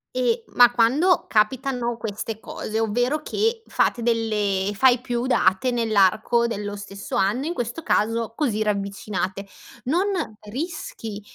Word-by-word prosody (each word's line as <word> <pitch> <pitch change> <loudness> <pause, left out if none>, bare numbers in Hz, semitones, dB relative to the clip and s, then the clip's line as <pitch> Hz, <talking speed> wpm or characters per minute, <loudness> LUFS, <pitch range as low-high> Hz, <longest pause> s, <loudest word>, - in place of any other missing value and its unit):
E 240 -2 +1
ma 245 -1 +7
quando 275 +11 +3
capitano 240 +2 0
queste 220 0 -5
cose, 220 0 -4
ovvero 245 +7 0
che 450 +6 -1
fate 240 - +1
delle 210 -4 0
fai 250 +3 +4
più 245 0 -2
date 190 -1 +2
nell'arco 225 +1 +2
dello 205 -2 -4
stesso 200 0 -7
anno, 245 +9 +1
in 340 - -2
questo 245 +2 -4
caso 225 +1 0
così 225 -8 0
ravvicinate, 200 -1 -3 0.4
non 345 +9 +1 0.4
rischi 230 - -5
230 Hz, 125 wpm, -23 LUFS, 210-255 Hz, 0.4 s, ma